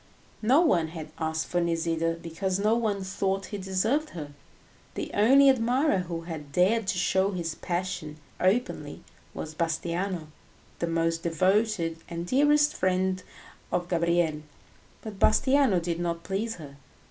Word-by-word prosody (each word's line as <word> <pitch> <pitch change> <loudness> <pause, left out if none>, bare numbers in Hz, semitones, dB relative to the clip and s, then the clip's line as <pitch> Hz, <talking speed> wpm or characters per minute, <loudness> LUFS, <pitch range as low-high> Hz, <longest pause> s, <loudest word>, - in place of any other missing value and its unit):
No 255 +8 +5
one 175 - +3
had 160 -1 -8
asked 160 -1 -1
for 175 - 0
Nisida 165 -1 0
because 180 +3 -2
no 210 +2 +2
one 215 -4 0
thought 190 +1 -1
he 205 - -3
deserved 215 +11 0
her. 145 -2 -6 0.6
The - - -4
only 270 +7 +6
admirer 255 -1 +3
who 170 -2 -4
had 160 -4 -7
dared 190 +7 +2
to 185 - 0
show 190 +2 +2
his 170 -3 -3
passion 175 -3 -4 0.2
openly 210 +7 0 0.3
was 155 - -6
Bastiano, 170 +1 -2 0.5
the 170 - -1
most 165 0 0
devoted 185 0 +1
and 170 0 -4
dearest 295 +7 +3
friend 185 0 0 0.5
of 175 0 -1
Gabriel; 170 -3 +1 0.6
but 210 -3 -8
Bastiano 265 -8 +4
did 170 0 -3
not 170 -1 -2
please 215 +5 -2
her. 140 -4 -11
180 Hz, 140 wpm, -27 LUFS, 165-210 Hz, 0.6 s, only